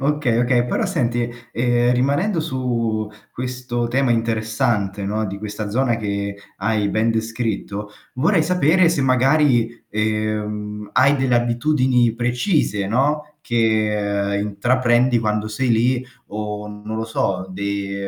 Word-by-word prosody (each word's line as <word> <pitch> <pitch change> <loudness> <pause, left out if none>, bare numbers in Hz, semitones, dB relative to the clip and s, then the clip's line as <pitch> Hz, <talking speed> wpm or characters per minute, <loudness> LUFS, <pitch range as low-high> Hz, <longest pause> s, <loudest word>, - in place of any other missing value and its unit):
Okay, 140 -4 +1
okay, 120 0 +2
però - - 0
senti, 120 -1 0 0.3
ehm, 120 0 +2
rimanendo 145 +9 +1
su 115 -7 -2 0.2
questo 125 -1 -3
tema 130 +1 +1
interessante, 110 -3 0
no, 105 +2 -1
di 100 0 -6
questa 105 0 -5
zona 120 +1 +1
che 100 -2 -3 0.2
hai 105 0 0
ben 110 +3 +1
descritto, 110 -2 -3 0.2
vorrei 160 +6 +3
sapere 175 +1 +3
se 170 - 0
magari, 130 -2 +2
ehm, 105 -1 -2
hai 140 +2 +4
delle 130 -2 +1
abitudini 120 0 +2
precise, 120 - 0
no, 150 +7 0
che 105 -5 0
intraprendi 120 +4 +2
quando 105 -1 -1
sei 125 +4 -1
lì 125 +3 +2 0.2
o 105 0 -5
non 105 +1 -6
lo 110 - -2
so, 95 -4 -1
di 100 +1 -3
115 Hz, 125 wpm, -21 LUFS, 105-130 Hz, 0.3 s, hai